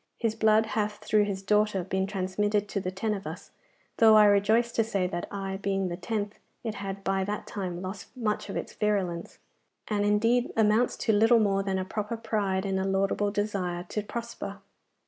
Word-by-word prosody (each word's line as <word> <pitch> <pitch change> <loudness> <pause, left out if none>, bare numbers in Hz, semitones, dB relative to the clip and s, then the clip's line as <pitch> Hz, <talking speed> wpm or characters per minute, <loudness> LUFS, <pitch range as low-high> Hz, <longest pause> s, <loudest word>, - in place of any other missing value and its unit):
His 225 -2 0
blood 220 0 +4
hath 215 -1 -1
through 210 0 +2
his 195 -1 -4
daughter 210 -1 +2
been 190 +1 -1
transmitted 205 +2 0
to 200 - -1
the 185 - -3
ten 210 +4 -2
of 195 -5 -5
us, 165 +5 -8 0.5
though 220 -1 +7
I 215 -1 +8
rejoice 210 +4 +4
to 230 - +2
say 200 -4 -1
that 175 -1 -3
I, 195 -1 -4
being 195 -1 -1
the 175 - -3
tenth, 210 +1 -3 0.2
it 225 -2 -2
had 195 -1 -6
by 195 0 +1
that 205 +1 -3
time 180 -3 -4
lost 190 +2 -6
much 210 -4 -1
of - - -3
its - - -5
virulence, 190 -5 -1 0.5
and 205 -2 0
indeed 230 +4 +2
amounts 220 +2 +3
to 220 - +3
little 225 +3 +5
more 195 -2 +2
than 195 -1 -1
a 185 - -2
proper 210 +4 -3
pride, 205 -4 -1
and 190 -1 0
a - - 0
laudable 195 +1 +1
desire 200 -4 -2
to 210 - -2
prosper. 235 +3 -6
205 Hz, 195 wpm, -28 LUFS, 195-215 Hz, 0.5 s, I